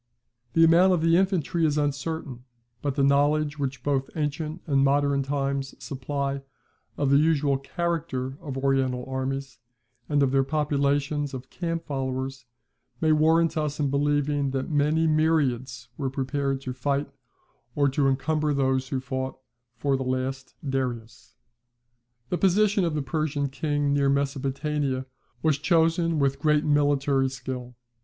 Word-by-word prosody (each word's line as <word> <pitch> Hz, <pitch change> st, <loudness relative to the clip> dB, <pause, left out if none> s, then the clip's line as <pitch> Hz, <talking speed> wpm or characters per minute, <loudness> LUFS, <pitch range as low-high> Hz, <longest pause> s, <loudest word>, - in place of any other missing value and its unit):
The 165 Hz, -, +5 dB
amount 175 Hz, +3 st, +6 dB
of 175 Hz, -, +1 dB
the 165 Hz, 0 st, +4 dB
infantry 180 Hz, -3 st, +1 dB
is 150 Hz, -2 st, +2 dB
uncertain; 145 Hz, -3 st, -2 dB, 0.4 s
but 140 Hz, -2 st, -2 dB
the 140 Hz, -, +2 dB
knowledge 145 Hz, +2 st, +2 dB
which 140 Hz, -1 st, -3 dB
both 135 Hz, -2 st, 0 dB
ancient 155 Hz, +2 st, -3 dB
and 140 Hz, -4 st, +2 dB
modern 140 Hz, 0 st, +2 dB
times 135 Hz, 0 st, -2 dB
supply 140 Hz, 0 st, -3 dB, 0.6 s
of 140 Hz, -2 st, +1 dB
the 140 Hz, -, +6 dB
usual 145 Hz, -3 st, +2 dB
character 150 Hz, -4 st, -3 dB
of 140 Hz, -5 st, -5 dB
Oriental 135 Hz, -2 st, 0 dB
armies, 135 Hz, 0 st, -4 dB, 0.5 s
and 145 Hz, -1 st, +3 dB
of 135 Hz, -, +2 dB
their 135 Hz, 0 st, +3 dB
populations 145 Hz, -1 st, 0 dB
of 130 Hz, 0 st, -9 dB
camp 165 Hz, -1 st, -3 dB
followers, 135 Hz, -2 st, -4 dB, 0.5 s
may 155 Hz, -, +2 dB
warrant 160 Hz, +2 st, +3 dB
us 150 Hz, -2 st, -2 dB
in 140 Hz, -2 st, +1 dB
believing 145 Hz, 0 st, +1 dB
that 135 Hz, +3 st, -3 dB
many 150 Hz, +2 st, +2 dB
myriads 135 Hz, -6 st, +1 dB
were 135 Hz, -2 st, -1 dB
prepared 135 Hz, 0 st, -2 dB
to 130 Hz, -2 st, -5 dB
fight, 140 Hz, +2 st, -1 dB, 0.6 s
or 145 Hz, -1 st, +3 dB
to 135 Hz, +1 st, +1 dB
encumber 150 Hz, +2 st, +1 dB
those 130 Hz, -1 st, +1 dB
who 130 Hz, 0 st, -2 dB
fought, 130 Hz, 0 st, -4 dB, 0.4 s
for 135 Hz, +4 st, 0 dB
the 135 Hz, -, -2 dB
last 130 Hz, +1 st, -3 dB
Darius. 125 Hz, -4 st, -4 dB, 0.9 s
The 180 Hz, -, -1 dB
position 200 Hz, +1 st, +3 dB
of 165 Hz, -2 st, -1 dB
the 150 Hz, -, -1 dB
Persian 145 Hz, -1 st, -1 dB
king 145 Hz, 0 st, 0 dB
near 140 Hz, -1 st, +2 dB
Mesopotamia 140 Hz, 0 st, -1 dB, 0.4 s
was 155 Hz, -3 st, +2 dB
chosen 165 Hz, 0 st, +2 dB
with 140 Hz, -1 st, +1 dB
great 150 Hz, 0 st, +2 dB
military 145 Hz, -2 st, +2 dB
skill. 125 Hz, -1 st, -6 dB
140 Hz, 145 wpm, -26 LUFS, 135-155 Hz, 0.9 s, amount